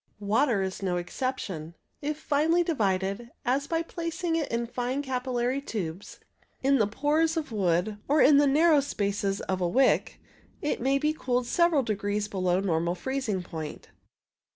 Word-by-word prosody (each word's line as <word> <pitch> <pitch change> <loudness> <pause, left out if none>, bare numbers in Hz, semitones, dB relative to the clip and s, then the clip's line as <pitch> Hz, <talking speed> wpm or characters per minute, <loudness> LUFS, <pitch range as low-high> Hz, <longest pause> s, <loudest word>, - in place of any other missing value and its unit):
Water 210 +1 +2
is 190 +1 -4
no 180 -2 0
exception. 175 - -4 0.3
If 300 +1 -2
finely 315 +4 +2
divided, 200 - -1 0.2
as 270 +3 +1
by 330 +1 0
placing 335 0 -3
it 320 -3 -1
in 235 0 0
fine 250 +4 -2
capillary 255 0 -1
tubes, 190 - -5 0.4
in 275 0 +4
the 210 - +3
pores 305 +8 +1
of 310 -6 -3
wood, 195 0 0
or 295 +2 +3
in 285 +1 +7
the 290 0 +5
narrow 305 +2 +5
spaces 200 -6 -1
of 185 -1 -2
a 175 - +2
wick, 260 +8 +2 0.4
it 300 - -2
may 270 +2 +2
be 300 +2 +1
cooled 250 -4 -1
several 335 +1 +3
degrees 205 -1 -1
below 185 -2 0
normal 170 -2 0
freezing 245 -5 -2
point. 160 -3 -7
245 Hz, 155 wpm, -27 LUFS, 195-285 Hz, 0.4 s, in